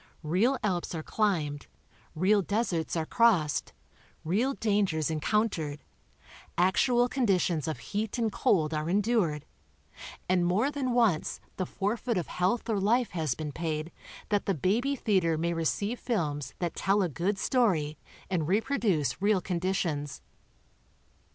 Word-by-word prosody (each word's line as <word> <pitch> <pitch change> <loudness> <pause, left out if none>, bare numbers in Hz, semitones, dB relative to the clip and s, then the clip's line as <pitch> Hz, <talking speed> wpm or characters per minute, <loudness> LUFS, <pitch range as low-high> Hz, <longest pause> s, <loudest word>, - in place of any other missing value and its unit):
Real 200 - +2
Alps 180 -4 -1
are 160 - -4
climbed, 160 -10 -1 0.5
real 195 +5 +3
deserts 190 -6 -1
are 160 -1 0
crossed, 185 -9 +2 0.5
real 225 +12 +1
dangers 195 -8 +1
encountered, 160 -3 -1 0.7
actual 240 +7 +3
conditions 185 - +1
of 160 - -2
heat 210 +3 -3
and 225 -2 0
cold 160 -6 +2
are 155 +1 -2
endured, 195 -7 +1 0.8
and 180 -1 +2
more 200 +11 +2
than 270 -4 -1
once 225 -10 +2 0.2
the 185 - -2
forfeit 225 +3 -1
of 175 - -1
health 185 +8 0
or 220 -3 0
life 230 +5 +2
has 160 -7 -1
been 155 -2 -5
paid 160 +1 -3 0.4
that 205 -1 0
the 195 - +2
baby 230 - +1
theater 185 - +1
may 170 +2 0
receive 200 +8 -1
films 150 - -2
that 175 -2 -2
tell 195 +1 +2
a - - +1
good 175 +6 -1
story 185 - +1 0.3
and 170 -5 -1
reproduce 200 - 0
real 205 -1 +3
conditions. 170 -6 -2
185 Hz, 135 wpm, -29 LUFS, 160-220 Hz, 0.8 s, real